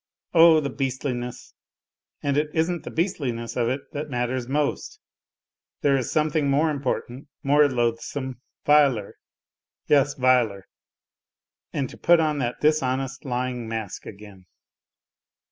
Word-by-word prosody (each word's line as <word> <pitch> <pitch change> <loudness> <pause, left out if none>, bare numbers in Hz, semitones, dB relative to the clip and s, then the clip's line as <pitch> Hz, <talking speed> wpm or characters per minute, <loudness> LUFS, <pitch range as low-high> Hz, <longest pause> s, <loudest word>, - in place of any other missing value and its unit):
Oh, 165 -1 +7
the 140 -2 -3
beastliness! 125 -2 -4 0.7
And 140 -1 0
it 150 +1 +1
isn't 165 +1 0
the - - -5
beastliness 130 - -2
of 120 -2 +1
it 130 +2 -2
that 150 +1 -4
matters 125 -1 -2
most! 145 +2 -2 0.8
There 140 -1 +3
is 130 -3 -1
something 155 -2 +1
more 150 +3 +2
important, 135 -2 -3 0.2
more 145 +1 +4
loathsome, 125 +1 -2 0.2
viler! 140 -8 +3 0.7
Yes, 145 -1 +3
viler! 125 -7 +2 1.1
And 135 - -2
to - - -13
put 175 -1 +5
on 155 -2 +1
that 120 -2 -3
dishonest 135 -3 0
lying 125 -2 -3
mask 110 -3 -5
again 100 -3 -12
135 Hz, 125 wpm, -24 LUFS, 120-150 Hz, 1.1 s, Oh